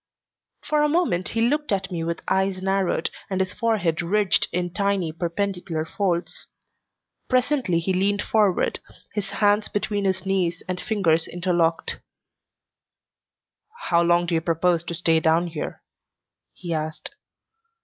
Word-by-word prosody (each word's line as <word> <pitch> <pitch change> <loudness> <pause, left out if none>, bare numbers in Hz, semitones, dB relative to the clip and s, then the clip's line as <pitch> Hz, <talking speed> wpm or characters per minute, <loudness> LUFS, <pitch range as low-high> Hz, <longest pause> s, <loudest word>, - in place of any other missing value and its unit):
For 300 -1 +1
a 300 - +3
moment 295 - +1
he 225 - -1
looked 295 +1 0
at 195 -1 -1
me 170 -2 -2
with 170 0 -3
eyes 190 0 +1
narrowed 190 -3 0 0.2
and 190 -1 -1
his 185 -1 -1
forehead 200 -9 0
ridged 200 +3 +2
in 175 -1 -2
tiny, 200 -4 0
perpendicular 175 -1 -2
folds. 175 -1 -2 0.8
Presently 255 - +2
he 170 +3 0
leaned 200 +2 +1
forward, 210 -5 +2 0.3
his 210 -1 -3
hands 210 0 +2
between 205 -1 -1
his 190 -1 0
knees 180 -3 0
and 185 -1 -3
fingers 170 -8 +2
interlocked. 175 -2 0 1.9
"How 170 -1 +4
long 175 0 +3
do 170 - -2
you 165 - +2
propose 170 0 +1
to 170 - -4
stay 165 -1 +3
down 160 +2 +3
here?" 165 -3 -6 0.7
he 175 -2 -5
asked. 155 0 -4
185 Hz, 140 wpm, -24 LUFS, 170-205 Hz, 1.9 s, How